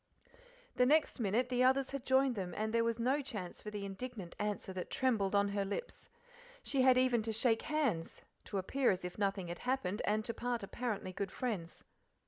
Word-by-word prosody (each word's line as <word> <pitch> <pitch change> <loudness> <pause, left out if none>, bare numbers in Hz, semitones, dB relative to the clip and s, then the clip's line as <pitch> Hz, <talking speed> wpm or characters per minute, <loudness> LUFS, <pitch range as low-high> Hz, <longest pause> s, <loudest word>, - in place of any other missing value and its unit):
The 250 - +5
next 305 0 +3
minute 230 +3 +1
the 250 0 +2
others 265 +1 +3
had 275 -2 -5
joined 265 0 +4
them, 185 -5 -4
and 220 +1 -1
there 230 0 +3
was 230 0 0
no 260 +5 +1
chance 210 -10 -6
for 210 - -6
the 205 -1 -5
indignant 200 -2 -6
answer 205 -2 -2
that 185 -1 -5
trembled 215 -7 +1
on 200 0 +3
her 200 0 0
lips. 205 - -5 0.5
She 275 - +1
had 255 -1 +6
even 255 -2 +3
to 225 +1 -2
shake 225 +1 +2
hands, 275 - -1 0.2
to 200 - -3
appear 255 +8 +1
as 180 -1 0
if 180 +3 -6
nothing 195 -3 0
had 175 - -5
happened, 245 -7 -1
and 215 +1 +1
to 230 - -2
part 240 -2 -2
apparently 205 -3 -3
good 195 0 -3
friends. 200 -9 -4
225 Hz, 200 wpm, -35 LUFS, 195-255 Hz, 0.5 s, had